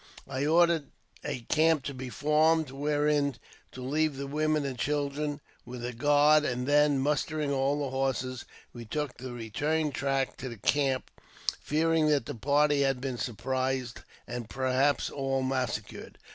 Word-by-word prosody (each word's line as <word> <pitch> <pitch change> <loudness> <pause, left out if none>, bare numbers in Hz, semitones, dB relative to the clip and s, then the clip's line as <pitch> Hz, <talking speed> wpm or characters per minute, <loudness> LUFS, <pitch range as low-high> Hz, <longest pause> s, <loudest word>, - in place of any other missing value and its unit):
I 135 +2 -2
ordered 170 -2 +4 0.4
a 125 - -3
camp 155 +3 +2
to 140 - -4
be 130 -1 -6
formed 155 +2 +2
wherein 145 0 +1 0.4
to 130 - -7
leave 150 +2 0
the 140 - -4
women 155 +1 0
and 135 -2 -3
children, 145 +2 -2 0.2
with 120 -1 -7
a 125 - -4
guard, 145 +4 +4
and 125 -3 -1
then, 145 0 +4
mustering 150 +2 0
all 140 +2 +1
the 135 - -3
horses, 130 -2 -1 0.3
we 120 - -8
took 145 +4 -4
the 130 +1 -7
return 145 +7 -1
track 135 -1 -1
to 130 - -5
the 115 - -8
camp, 135 +4 0 0.5
fearing 160 +1 +2
that 145 -5 +2
the - - -5
party 145 +4 +2
had 135 -2 +1
been 130 -2 -4
surprised 130 +1 -2 0.3
and 120 -2 -6
perhaps 130 +3 +1
all 135 -1 -1
massacred. 130 -2 -3
140 Hz, 155 wpm, -29 LUFS, 130-150 Hz, 0.5 s, ordered